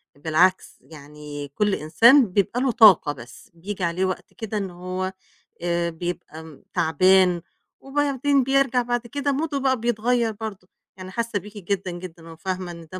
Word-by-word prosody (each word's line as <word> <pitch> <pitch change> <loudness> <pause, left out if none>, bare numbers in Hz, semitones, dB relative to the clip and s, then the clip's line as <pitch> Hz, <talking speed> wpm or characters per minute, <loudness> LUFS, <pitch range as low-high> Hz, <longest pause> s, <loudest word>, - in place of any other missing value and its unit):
بالعكس، 165 +5 +1
يعني 150 -1 -10
كل 210 -2 +1
إنسان 225 - +5
بيبقى 205 +5 +1
له 265 -2 +2
طاقة 205 -10 +6
بس 120 -3 -14
بييجي 185 +3 -6
عليه 175 +3 0
وقت 185 -1 -5
كده 220 -2 -5
إن 195 -2 -3
هو 185 +1 -4 0.5
آآ 170 0 0
بيبقى 160 -3 -7
تعبان 180 +2 +3 0.4
وبعدين 280 -1 +1
بيرجع 270 -1 +2
بعد 240 0 -2
كده 285 +2 -1
موده 290 0 -2
بقى 260 -2 +1
بيتغيّر 235 0 +1
برضه. 205 -4 -8 0.3
أنا 185 0 -8
حاسّة 230 0 -2
بيكِ 210 +3 -12
جدًا، 190 -1 -3
جدًا 175 -2 -10
وفاهمة 180 +2 -5
إن 170 -1 -11
ده 185 - -5
190 Hz, 150 wpm, -23 LUFS, 170-235 Hz, 0.5 s, طاقة